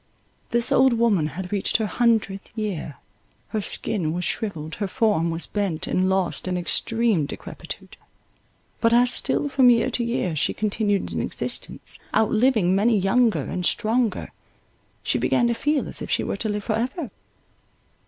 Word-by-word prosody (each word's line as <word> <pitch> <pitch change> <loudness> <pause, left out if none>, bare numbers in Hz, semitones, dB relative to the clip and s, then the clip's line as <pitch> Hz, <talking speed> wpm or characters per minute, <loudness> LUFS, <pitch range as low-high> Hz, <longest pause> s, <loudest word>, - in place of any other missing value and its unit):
This 235 0 +1
old 260 -1 +5
woman 225 -9 +2
had 185 -1 -5
reached 200 -2 +1
her 220 - -1
hundredth 215 -4 0
year; 190 -9 -3 0.5
her 215 - -2
skin 175 -5 -1
was 180 +1 -2
shrivelled, 165 -8 -3
her 200 - +1
form 205 -6 +1
was 165 +1 0
bent 195 -6 -2
and 185 +1 +1
lost 190 -1 -1
in 180 -1 -1
extreme 220 -2 +1
decrepitude; - - -9 0.8
but 230 0 +3
as 245 +1 +4
still 290 - 0
from 265 -3 +5
year 240 +2 +3
to 245 - -1
year 235 -8 -1
she 150 - 0
continued 205 -1 0
in - - -1
existence, - - -5 0.2
out 220 - +3
living 220 -6 +3
many 215 +3 +3
younger 215 +4 +2
and 180 - -4
stronger, 225 +2 +1 0.7
she - - 0
began 240 - +2
to - - +2
feel 290 +5 0
as - - -8
if - - -5
she - - +1
were - - -3
to 220 - -2
live 210 0 -2
for 215 - -1
ever. 250 - -2
215 Hz, 165 wpm, -24 LUFS, 185-235 Hz, 0.8 s, old